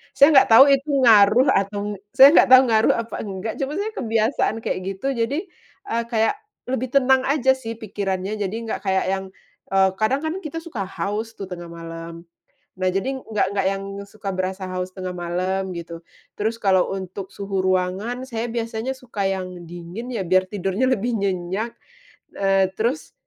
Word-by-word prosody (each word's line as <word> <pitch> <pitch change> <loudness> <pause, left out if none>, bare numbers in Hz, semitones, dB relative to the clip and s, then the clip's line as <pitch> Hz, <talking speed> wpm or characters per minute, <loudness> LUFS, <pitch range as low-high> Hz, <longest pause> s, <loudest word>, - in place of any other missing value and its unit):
Saya 285 +3 +7
nggak 265 - +7
tahu 265 +5 +9
itu 275 +2 +1
ngaruh 220 +3 +6
atau 205 +1 -1 0.2
saya 265 +2 +9
nggak - - +6
tau 260 0 +10
ngaruh 220 -1 +4
apa 230 0 -4
nggak. 200 +1 -5
Cuma 275 +1 -2
saya 425 +2 -2
kebiasaan 225 - 0
kayak - - -1 0.2
gitu. 190 - -5
Jadi, 275 - -1 0.4
eee, 235 0 0
kayak 225 - +2 0.3
lebih 255 -1 -2
tenang 265 -1 +4
aja 265 -2 +3
sih, 230 -3 -6
pikirannya. 195 -1 -3
Jadi 205 -1 -3
nggak - - -4
kayak 190 -1 +1
yang, 190 0 -1 0.5
eee, 190 0 +4
kadang 220 +6 +2
kan, 315 - -1
kita 320 +1 -5
suka 270 - -5
haus 210 +4 -4
tuh, 195 - -5
tengah 175 -2 -7
malam. 165 0 -8 0.6
Nah, 185 - +2
jadi 195 +9 -1
nggak 215 -4 -1
nggak 195 - +1
yang 195 0 -3 0.3
suka 200 -1 -6
berasa 185 +1 -3
haus 185 0 -3
tengah 185 -1 -5
malam, 185 +2 -2
gitu. 170 0 -7 0.4
Terus 220 +2 -1
kalau 190 -2 +2
untuk 190 0 -7
suhu 195 -1 -3
ruangan, 190 +7 -1
saya 230 -1 -3
biasanya 230 +1 -3
suka 235 -6 -5
yang 185 -2 -4
dingin, 175 +7 -8
ya. 195 - -2
Biar 185 +1 +3
tidurnya 200 +5 -1
lebih 240 0 0
nyenyak. 195 +3 -2 0.6
Eee, 195 -1 +2
terus, 245 +8 -2
205 Hz, 170 wpm, -22 LUFS, 190-240 Hz, 0.6 s, tau